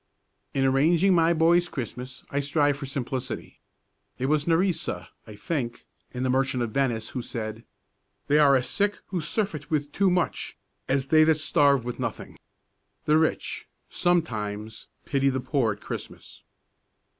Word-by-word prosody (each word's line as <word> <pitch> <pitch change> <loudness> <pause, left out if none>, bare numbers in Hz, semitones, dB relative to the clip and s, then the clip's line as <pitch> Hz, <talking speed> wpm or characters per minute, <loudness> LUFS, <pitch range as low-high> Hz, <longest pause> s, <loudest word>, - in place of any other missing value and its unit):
In 135 -1 +2
arranging 160 +8 +4
my 165 -1 +4
boy's 170 +2 +3
Christmas 125 0 -6
I 140 - 0
strive 145 0 +1
for 140 -1 -6
simplicity. 130 -2 -4 0.6
It 130 - -2
was 150 +2 +1
Nerissa, 170 +1 0 0.2
I 105 - -10
think, 120 0 -3 0.3
in 125 0 -4
the 130 - +1
"Merchant 130 -1 +1
of 115 - -3
Venice," 120 -4 0
who 125 - -4
said: 110 -1 -6 0.6
"They 150 +1 +4
are 140 -2 +6
as 130 -1 +1
sick 205 0 0
who 180 -3 -2
surfeit 165 -4 -2
with 145 -2 -1
too 195 +3 +2
much, 180 -1 -1 0.3
as 135 0 0
they 155 0 +6
that 160 -1 +4
starve 140 -4 +3
with 125 +1 -5
nothing." 115 -4 -5 0.7
The 155 +1 +4
rich 160 - -1 0.2
sometimes 110 - -1 0.2
pity 140 -1 +2
the 130 0 -1
poor 125 -3 +1
at 105 - -16
Christmas. - - -8
140 Hz, 155 wpm, -26 LUFS, 125-160 Hz, 0.7 s, are